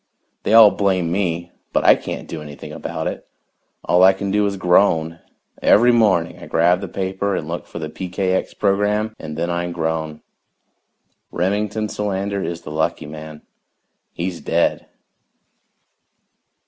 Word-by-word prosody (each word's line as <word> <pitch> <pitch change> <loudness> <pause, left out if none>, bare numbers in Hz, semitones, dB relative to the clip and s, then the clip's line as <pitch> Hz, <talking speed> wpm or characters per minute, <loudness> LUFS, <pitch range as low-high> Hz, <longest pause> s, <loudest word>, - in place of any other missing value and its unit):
They 110 - +2
all 110 -3 +9
blame 95 -4 0
me, 85 -2 -1 0.2
but - - +2
I - - +9
can't - - -6
do 80 - -6
anything 75 -1 -9
about - - -5
it. - - -5 0.6
All 90 - +3
I 95 +1 +7
can 95 +1 -4
do 105 0 +2
is 100 -1 -3
groan 85 -3 +2 0.4
every 120 +4 +5
morning 100 -8 +2
I - - -10
grab 90 +2 +2
the - - -4
paper 95 +1 -2
and 75 - -4
look 85 +1 -5
for - - -9
the 80 -2 -4
PKX 95 +3 -2
program 105 +2 +1
and 75 -1 -7
then 85 +1 -1
I 85 0 -2
groan. 80 -2 -3 1.1
Remington 105 +4 -1
Solander 100 -1 -2
is 85 -2 -4
the 75 - -8
lucky 80 0 -1
man 75 0 -9 0.7
he's 85 0 -4
dead. 85 +1 0
90 Hz, 145 wpm, -20 LUFS, 80-100 Hz, 1.1 s, all